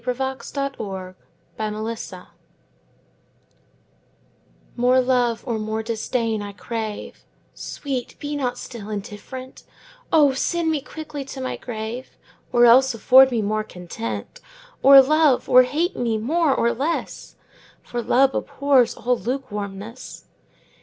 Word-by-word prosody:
Against 265 +2 -4
Indifference 215 -1 -5 2.6
MORE 250 +1 +3
love 245 -3 +1
or 230 -4 -2
more 220 +1 -3
disdain 225 0 -2
I 205 0 -7
crave; 220 0 -6 0.3
Sweet, 265 -4 -5
be 290 0 -4
not 250 -3 -2
still 220 -4 -8
indifferent: 220 +5 -7 0.5
O 295 -4 +5
send 330 +4 0
me 305 -3 -1
quickly 300 -1 -7
to 270 0 -8
my 260 - -3
grave, 235 +2 -7 0.3
Or 240 -1 +5
else 250 +1 +6
afford 260 +4 +7
me 235 -4 -1
more 215 +1 -1
content! 115 - -7 0.4
Or 275 0 +9
love 305 -1 +3
or 255 - +8
hate 305 +9 -1
me 230 -2 0
more 305 +8 +1
or 235 -2 +2
less, 295 +7 -3 0.5
5 - - -25
For 240 - -1
love 265 +3 +3
abhors 280 -4 +2
all 250 +1 +1
lukewarmness. 225 -3 -6
245 Hz, 120 wpm, -22 LUFS, 220-270 Hz, 2.6 s, Or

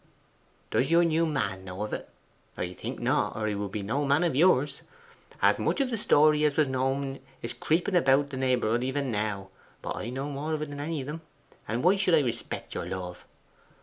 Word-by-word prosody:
'Does 135 - +2
your 170 +1 +5
new 165 0 +2
man 105 -11 -2
know 95 +2 -5
of 105 - -5
it? - - -5 0.5
I 90 0 -3
think - - -6
not, - - +1
or 110 - -2
he 105 - 0
would 100 -1 -3
be 105 0 -3
no 135 +9 -1
man 140 +4 +3
of 165 -6 +1
yours! 145 -3 +3 0.6
As - - +5
much - - 0
of 270 -2 +1
the - - 0
story 150 -6 +4
as 150 -2 +2
was 155 -2 +4
known 135 +1 -1 0.2
is 115 - -3
creeping 175 +5 0
about 140 -3 +4
the 130 - -4
neighbourhood 125 -3 +1
even 130 0 -1
now; 105 -2 -2 0.3
but - - -3
I 115 - -4
know 135 +3 -3
more 150 +2 -2
than 145 -1 -5
any 155 0 -2
of - - -6
them, 150 +3 -6 0.5
and 115 +3 -2
why 185 +3 +5
should 185 -3 +4
I 155 - +5
respect 120 -5 -4
your 85 - -4
love? 90 -1 -6
135 Hz, 210 wpm, -28 LUFS, 110-155 Hz, 0.6 s, your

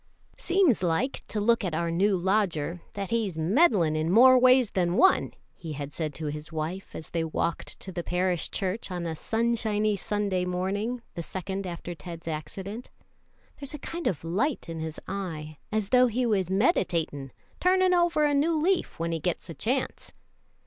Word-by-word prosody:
"Seems 355 - +3
like, 180 +10 0
to 215 - -3
look 230 +2 +3
at 175 -5 -2
our 170 +1 -1
new 190 +3 +2
lodger, 180 -4 0
that 200 +1 -5
he's 215 -7 0
mendin' 175 - +3
in 155 +1 0
more 255 +5 +8
ways 255 -2 +5
than 175 -1 +1
one," 380 - +4 0.2
he 160 -3 -7
had 145 0 -6
said 155 -4 -3
to 160 - -5
his 150 +2 -5
wife 160 +4 -4
as 160 - -8
they 165 -1 0
walked 165 +1 -3
to 190 - -6
the 175 -1 -4
parish 180 -1 0
church 195 +2 -3
on 175 -2 -4
a 165 - -2
sunshiny 220 0 0
Sunday 200 -2 -1
morning, 200 +7 -2
the 170 - -4
second 190 +3 -4
after 175 0 -6
Ted's 165 +1 -9
accident. 190 +9 -5 0.7
"There's 285 +1 -5
a - - -5
kind 335 +4 -4
of 165 - -1
a - - -6
light 230 - 0
in 165 -1 -5
his 160 -1 -5
eye, 160 -6 -5
as 215 -2 -1
though 250 0 +6
he 245 +2 0
was 195 -6 +1
meditatin' 175 - +1 0.3
turnin' 370 0 +4
over 345 -3 +3
a 295 -1 +3
new 310 +4 +2
leaf 365 +4 +1
when 170 0 -2
he 165 - -1
gets 170 +1 -2
a - - -6
chance." 250 - -2
190 Hz, 185 wpm, -27 LUFS, 165-235 Hz, 0.7 s, more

